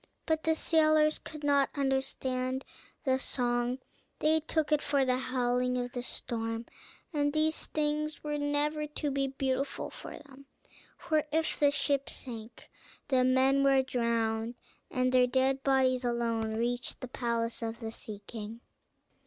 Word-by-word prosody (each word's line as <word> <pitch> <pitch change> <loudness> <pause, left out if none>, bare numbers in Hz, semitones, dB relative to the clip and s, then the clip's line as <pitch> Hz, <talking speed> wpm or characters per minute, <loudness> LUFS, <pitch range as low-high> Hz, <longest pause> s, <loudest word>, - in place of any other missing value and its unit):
But 315 -1 0
the 320 0 +3
sailors 310 -1 +4
could 305 -1 -9
not 280 -1 +3
understand 265 -1 -1 0.4
the 260 -2 +2
song, 245 -1 0 0.4
they 315 +1 +3
took 315 0 -1
it 300 -1 +4
for 280 -2 +2
the 255 0 +2
howling 250 -1 0
of 245 0 -2
the 245 -1 -3
storm. 225 -2 -4 0.5
And 290 -1 +1
these 310 +1 +1
things 305 0 -1
were 295 -1 -2
never 295 +1 0
to 295 -1 -2
be 275 0 +1
beautiful 270 0 -2
for - - -8
them; 275 -1 -15 0.5
for 310 -2 +1
if 320 +1 0
the 290 - +6
ship 280 -1 0
sank, 230 -3 -7 0.4
the 260 -2 +4
men 260 +2 +4
were 270 -1 +5
drowned, 230 -2 0 0.3
and 255 0 +1
their 250 -1 +5
dead 265 +1 +2
bodies 260 -2 +3
alone 230 -2 0
reached 240 +2 -2
the 255 - -6
palace 235 -1 -1
of 230 0 -4
the 225 -2 -5
Sea 210 -2 -8
King. 225 0 -7
265 Hz, 150 wpm, -31 LUFS, 245-290 Hz, 0.5 s, the